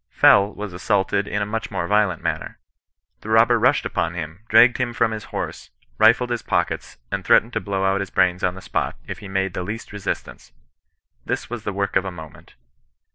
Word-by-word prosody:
Fell 100 +1 +5
was 105 -2 -7
assaulted 100 +2 0
in 105 0 -1
a - - -2
much 110 +2 -4
more 85 - -2
violent 105 -4 +1
manner. - - -3 0.6
The 110 - -10
robber 115 +2 +5
rushed - - +3
upon 85 +1 -2
him, 80 0 -6
dragged 120 +2 +6
him 120 -2 -1
from 115 -1 +1
his 110 -1 -5
horse, - - -6 0.3
rifled 120 +2 +4
his 120 -1 -1
pockets, - - -2
and - - -2
threatened 115 +3 +4
to - - -1
blow 95 -1 -2
out 95 +1 +2
his 100 -2 -4
brains 90 0 +1
on 90 0 +1
the 95 - -10
spot - - -2
if - - -7
he 100 - -9
made 95 -1 -1
the 90 - -3
least 105 +4 -6
resistance. 100 -1 -5 0.7
This, - - -4
was 120 -3 -6
the 105 - -1
work 100 0 -2
of 95 - +2
a - - -2
moment. 80 -3 -12
100 Hz, 205 wpm, -22 LUFS, 95-110 Hz, 0.7 s, dragged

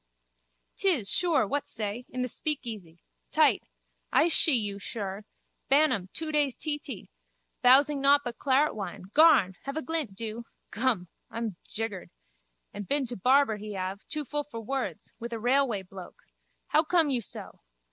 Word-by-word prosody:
'Tis, 315 - +2
sure. 340 -9 +2
What 285 +6 -2
say? 220 +2 -4
In 255 0 -3
the - - -1
speakeasy. 220 - -5 0.3
Tight. - - +3 0.5
I 335 - +4
shee 315 -2 +5
you, 205 -4 -2
shir. 200 -1 -5 0.4
Bantam, 265 -10 +3
two 320 -1 -4
days 290 -4 +1
teetee. 290 - -5 0.5
Bowsing 275 +3 +5
nowt 285 +1 +5
but 240 -1 -6
claretwine. 240 -9 0
Garn! 270 - +5
Have 275 +2 -4
a 315 - -2
glint, 315 -11 -2
do. 225 +2 -6 0.3
Gum, 215 -5 0 0.2
I'm 225 -5 -4
jiggered. 215 -4 -5 0.6
And 205 -2 -7
been 280 -1 +1
to 245 0 -5
barber 255 +2 +3
he 210 0 -7
have. 190 +1 -4
Too 305 -1 -2
full 295 +2 -2
for 230 -6 -8
words. 225 - -4
With 235 +1 -6
a 230 - -3
railway 245 -4 +1
bloke. 185 0 -12 0.5
How 310 - +4
come 320 -2 +2
you 250 -3 +2
so? - - -7
245 Hz, 155 wpm, -28 LUFS, 205-290 Hz, 0.6 s, shee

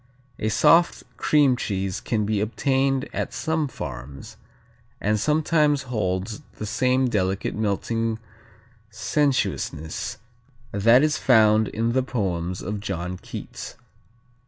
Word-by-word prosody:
A 110 - 0
soft 165 +10 +4
cream 145 -4 +4
cheese 95 -5 -3
can 110 -3 -1
be 105 -1 0
obtained 135 +4 +1
at - - -3
some 160 -2 0
farms, 70 - -8 0.6
and 105 +1 +1
sometimes 150 +1 +2
holds 105 -4 -2
the 110 - -6
same 130 +4 +2
delicate 95 -4 -1
melting 110 +2 -1 0.7
sensuousness 110 - -1 0.5
that 115 +7 +5
is 155 0 +1
found 110 -3 +5
in 115 +3 -1
the 130 +2 +2
poems 90 -8 -2
of 105 +2 -3
John 90 -2 -4
Keats. - - -8
110 Hz, 110 wpm, -24 LUFS, 100-130 Hz, 0.7 s, that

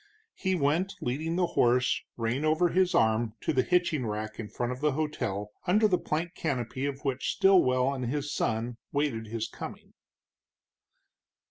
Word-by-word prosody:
He 190 0 -1
went 165 +5 +1
leading 155 +7 -2
the 180 0 +2
horse, 125 -5 +2 0.2
rein 120 +5 -1
over 160 +3 +3
his 185 +1 +2
arm, 110 0 +2
to - - 0
the 130 - +4
hitching 175 -4 +1
rack 110 0 -4
in 105 -2 -5
front 120 0 -2
of 125 - -5
the 150 -2 +2
hotel, 105 -9 -2 0.2
under 210 +4 +5
the 180 -3 +2
plank 165 +3 -2
canopy 130 -2 -2
of 140 +1 -6
which 135 -1 -1
Stilwell 140 -10 +4
and 130 -3 -3
his 145 +3 -2
son 115 +2 -1
waited 140 -6 -1
his 110 0 -3
coming. - - -9
140 Hz, 160 wpm, -29 LUFS, 120-165 Hz, 0.2 s, under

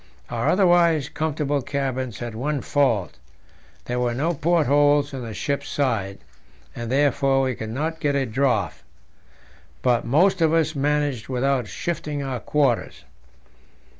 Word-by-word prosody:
Our - - 0
otherwise 175 -6 +3
comfortable 150 -2 -1
cabins 130 -4 -3
had 120 -2 -6
one 140 +5 -2
fault; 120 - 0 0.7
there 125 0 -2
were 120 -1 0
no 160 +7 0
portholes 145 -2 +2
in 135 - -5
the 115 -3 -6
ship's 140 -2 -3
side, 110 -9 -1 0.6
and 120 0 -5
therefore 135 -1 +2
we 130 -1 0
could 110 -2 -6
not 155 +7 -3
get 145 -2 0
a 135 -1 +1
draught; 130 +3 0 1.0
but 125 -2 +2
most 170 - +3
of 160 -1 +3
us 160 -1 +2
managed 145 -4 -1
without 130 -2 0
shifting 150 - -4
our 130 -2 -3
quarters. 140 -5 0
140 Hz, 135 wpm, -23 LUFS, 125-150 Hz, 1.0 s, otherwise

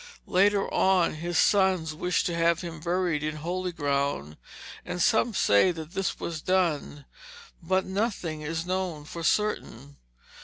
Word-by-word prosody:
Later 200 +2 +3
on 190 -3 +3
his 170 +2 -3
sons 190 -5 +3
wished 180 +3 0
to 175 -3 -1
have 170 0 +2
him 170 -3 -7
buried 175 -2 0
in 155 0 -3
holy 180 +4 -3
ground, 140 - -1 0.5
and 180 0 -5
some 225 +5 +3
say 100 - +4
that 160 -2 -8
this 195 -1 -2
was 160 -2 -4
done, 165 -6 0 0.6
but 185 +3 0
nothing 190 -6 -2
is 160 +2 -3
known 180 -5 -3
for 170 +2 -7
certain. 145 - -1
170 Hz, 145 wpm, -27 LUFS, 155-185 Hz, 0.6 s, say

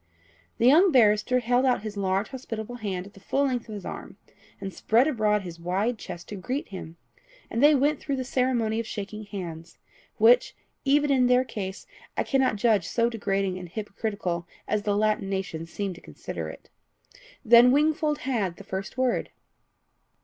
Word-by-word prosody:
The 230 - +1
young 335 +9 +6
barrister 235 0 +4
held 245 +2 +2
out 250 -5 +2
his 215 -1 -5
large 195 +1 0
hospitable 245 -3 -6
hand 190 -5 -4
at 200 - -14
the - - -15
full 275 +8 0
length 245 -4 -2
of 215 - -5
his 205 - -8
arm, - - -7 0.4
and 195 -1 -6
spread 235 +6 +3
abroad 210 -7 +1
his 170 -2 -8
wide 195 +7 -1
chest 170 - -8
to 210 - -5
greet 255 +9 -4
him, 170 -4 -8 0.5
and 230 - -1
they 295 +1 +7
went 290 +2 +2
through 280 - -2
the 260 - -2
ceremony 245 -4 0
of 230 - -4
shaking 210 0 -6
hands, 170 -5 -7 0.4
which, 240 +3 +5 0.3
even 290 +1 +3
in 255 -2 +4
their 250 +1 +4
case, 195 -6 -6 0.3
I - - +2
cannot 265 -5 +2
judge 210 -4 +2
so 235 0 +1
degrading 195 -4 -1
and 180 -1 -9
hypocritical 200 -4 -4 0.2
as 210 0 0
the 205 -1 0
Latin 210 -2 +1
nations 175 -4 -4
seem 200 -2 -3
to 175 - -14
consider - - -6
it. - - -12 0.7
Then 240 +2 +8
Wingfold 300 +1 +2
had 215 -10 -1
the - - -12
first 190 +4 -6
word. 255 -2 0
215 Hz, 180 wpm, -26 LUFS, 195-250 Hz, 0.7 s, Then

